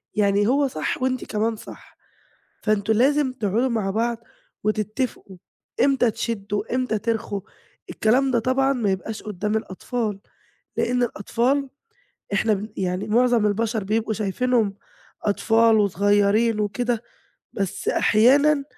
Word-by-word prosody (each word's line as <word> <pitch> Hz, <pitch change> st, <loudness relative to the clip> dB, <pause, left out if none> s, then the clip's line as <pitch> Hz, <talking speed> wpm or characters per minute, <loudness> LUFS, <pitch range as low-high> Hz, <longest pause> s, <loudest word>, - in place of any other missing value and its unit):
يعني 205 Hz, 0 st, +2 dB
هو 280 Hz, +3 st, +3 dB
صح 155 Hz, -, -3 dB
وأنتِ 255 Hz, -1 st, -1 dB
كمان 220 Hz, +2 st, -1 dB
صح -, -, -13 dB, 0.7 s
فأنتم 215 Hz, 0 st, +1 dB
لازم 270 Hz, +3 st, +3 dB
تقعُدوا 235 Hz, +1 st, 0 dB
مع 215 Hz, -5 st, -1 dB
بعض 230 Hz, +2 st, -1 dB, 0.5 s
وتتفقوا 215 Hz, -1 st, -2 dB, 0.5 s
إمتى، 270 Hz, -4 st, +3 dB
تشدّوا 210 Hz, 0 st, -3 dB
إمتى 255 Hz, -4 st, 0 dB
ترخوا، 220 Hz, -2 st, -2 dB, 0.5 s
الكلام 255 Hz, +5 st, +2 dB
ده 245 Hz, -, +2 dB
طبعًا 260 Hz, +3 st, +2 dB
ما 230 Hz, -7 st, 0 dB
يبقاش 200 Hz, +3 st, -4 dB
قدّام 210 Hz, +1 st, -2 dB
الأطفال، 215 Hz, 0 st, -3 dB, 0.6 s
لإن 245 Hz, +1 st, +1 dB
الأطفال 250 Hz, +5 st, 0 dB, 0.7 s
إحنا 215 Hz, +2 st, +2 dB
بن 210 Hz, +2 st, -4 dB
يعني 185 Hz, 0 st, -2 dB
مُعظم 240 Hz, 0 st, +3 dB
البشر 220 Hz, +1 st, -1 dB
بيبقوا 220 Hz, +2 st, -1 dB
شايفينهم 220 Hz, +1 st, 0 dB, 0.5 s
أطفال 225 Hz, +2 st, +3 dB
وصغيّرين 205 Hz, +3 st, +2 dB
وكده 235 Hz, +3 st, -1 dB, 0.5 s
بس 195 Hz, -3 st, -3 dB
أحيانًا 280 Hz, +6 st, +4 dB
220 Hz, 120 wpm, -23 LUFS, 205-245 Hz, 0.7 s, أحيانًا